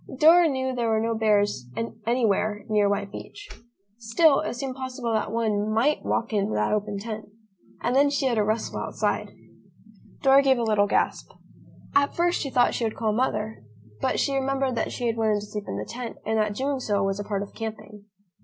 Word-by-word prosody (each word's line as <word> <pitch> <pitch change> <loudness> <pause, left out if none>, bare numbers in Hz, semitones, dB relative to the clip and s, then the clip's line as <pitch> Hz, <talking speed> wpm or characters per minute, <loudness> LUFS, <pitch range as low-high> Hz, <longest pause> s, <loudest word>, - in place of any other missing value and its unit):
Dora 330 +4 +7
knew 260 -1 -1
there 240 -2 -1
were 220 -1 +2
no 230 +1 0
bears 205 - +1 0.4
anywhere 215 -3 +1
near 210 -2 +2
White 200 0 -2
Beach. 410 - -10 0.5
Still, 275 +6 +4
it - - -3
seemed 260 +1 -4
possible 255 -3 -4
that 220 - -1
one 215 -2 0
might 250 +8 +2
walk 230 -1 -1
into 200 - 0
that 105 - +1
open 210 -1 -1
tent. 215 +1 -6 0.6
And 245 - +1
then 285 +1 +5
she 280 -1 -1
heard 235 -4 +1
a - - +3
rustle 215 +2 -1
outside. - - -2 0.9
Dora 270 0 +7
gave 270 -2 +3
a 235 - -1
little 210 -2 +2
gasp. - - 0 0.6
At 280 0 +2
first, 345 +1 +1
she 275 - -3
thought 245 -2 +3
she - - -2
would 220 -1 -1
call 220 -2 0
Mother, 220 - -1 0.4
but - - 0
she 280 - +1
remembered 270 -1 0
that - - -1
she 245 - -4
had 230 -1 0
wanted 215 -2 +1
to - - -7
sleep 210 0 -6
in 100 - -4
the 105 - -4
tent 240 -1 -7
and 220 0 +1
that 210 -1 0
doing 270 +3 -1
so 205 -5 0
was 195 0 -1
a - - -2
part 200 -1 -2
of 200 - -11
camping. 215 -2 -7
225 Hz, 205 wpm, -25 LUFS, 210-260 Hz, 0.9 s, Dora